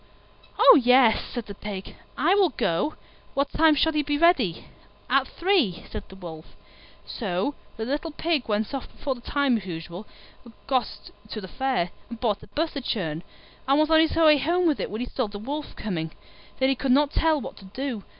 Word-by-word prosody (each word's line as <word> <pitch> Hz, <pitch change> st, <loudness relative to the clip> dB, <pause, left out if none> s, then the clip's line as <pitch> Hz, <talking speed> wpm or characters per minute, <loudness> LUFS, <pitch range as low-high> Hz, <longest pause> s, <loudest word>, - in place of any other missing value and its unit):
"Oh, 285 Hz, -, +8 dB
yes," 250 Hz, -2 st, +5 dB
said 240 Hz, -3 st, -4 dB
the 205 Hz, -, -8 dB
Pig, 200 Hz, -1 st, -7 dB, 0.2 s
"I 325 Hz, +7 st, +3 dB
will 395 Hz, -3 st, +4 dB
go; 215 Hz, -, -1 dB, 0.4 s
what 280 Hz, +1 st, 0 dB
time 320 Hz, -1 st, +4 dB
shall 320 Hz, +2 st, +2 dB
you 300 Hz, -, +2 dB
be 290 Hz, 0 st, -1 dB
ready?" 290 Hz, -, +3 dB, 0.5 s
"At 270 Hz, 0 st, +3 dB
three," 340 Hz, -, +1 dB
said -, -, -6 dB
the 190 Hz, -, -12 dB
Wolf. 165 Hz, -4 st, -10 dB, 0.5 s
So 195 Hz, +4 st, -2 dB, 0.2 s
the 220 Hz, -, -3 dB
little 290 Hz, +6 st, -2 dB
Pig 315 Hz, -3 st, -1 dB
went 210 Hz, +4 st, -1 dB
off 275 Hz, -, -5 dB
before 275 Hz, -, -3 dB
the 245 Hz, -, -13 dB
time, 275 Hz, -1 st, +1 dB
as 195 Hz, -3 st, -8 dB
usual, 170 Hz, +3 st, -7 dB, 0.4 s
and 235 Hz, -2 st, -15 dB
got 260 Hz, -2 st, -2 dB, 0.2 s
to 215 Hz, -, -5 dB
the 190 Hz, -, -8 dB
Fair, 250 Hz, -6 st, -1 dB, 0.2 s
and 235 Hz, -1 st, -8 dB
bought 215 Hz, -4 st, 0 dB
a -, -, -14 dB
butter 300 Hz, +5 st, -2 dB
churn, 165 Hz, -11 st, -2 dB, 0.5 s
and 275 Hz, +1 st, +4 dB
was 310 Hz, +1 st, +2 dB
on 320 Hz, -, +7 dB
his 320 Hz, 0 st, +3 dB
way 310 Hz, -3 st, +6 dB
home 345 Hz, +6 st, +1 dB
with 310 Hz, -4 st, +2 dB
it -, -, -2 dB
when 215 Hz, +3 st, -4 dB
he 250 Hz, -, -3 dB
saw 255 Hz, -2 st, -2 dB
the 205 Hz, 0 st, -8 dB
Wolf 285 Hz, +8 st, -5 dB
coming. 165 Hz, -6 st, -3 dB, 0.5 s
Then 265 Hz, 0 st, +2 dB
he 270 Hz, -, +2 dB
could 265 Hz, 0 st, -1 dB
not 285 Hz, +2 st, +4 dB
tell 320 Hz, -2 st, +2 dB
what -, -, -7 dB
to 195 Hz, -, -13 dB
do. 235 Hz, +1 st, -5 dB
260 Hz, 205 wpm, -25 LUFS, 205-295 Hz, 0.5 s, Oh